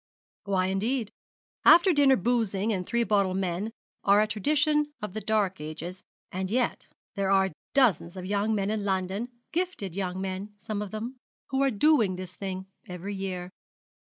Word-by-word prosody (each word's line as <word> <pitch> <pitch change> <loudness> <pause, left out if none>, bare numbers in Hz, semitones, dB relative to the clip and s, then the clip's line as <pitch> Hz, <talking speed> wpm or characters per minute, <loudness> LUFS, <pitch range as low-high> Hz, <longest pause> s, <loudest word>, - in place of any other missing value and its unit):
'Why, 190 -2 +1
indeed? 210 +4 -1 0.5
After 345 +2 +7
dinner 280 -3 +6
boozing 220 -2 +1
and 180 -2 -3
three 235 0 +2
bottle 200 -4 +2
men 190 +3 -1 0.3
are 200 +1 +5
a 215 - +4
tradition 295 - +2
of 210 -3 -5
the 215 - -4
dark 205 -5 0
ages; 160 +4 -6 0.3
and 185 +1 -3
yet 245 +3 0 0.3
there 195 -2 -1
are 190 -1 +4 0.2
dozens 205 -9 +3
of 185 - -5
young 205 +3 +1
men 200 0 0
in 215 -1 -1
London 195 +4 -1 0.2
gifted 335 - -2
young 185 -1 -2
men 195 +2 -4
some 215 -1 -4
of 210 - -4
them 230 +6 -5 0.3
who 270 0 0
are 275 - +4
doing 225 -4 +3
this 185 -1 -7
thing 190 -1 -5 0.2
every 180 +3 -5
year. 185 -2 -4
200 Hz, 165 wpm, -28 LUFS, 185-230 Hz, 0.5 s, After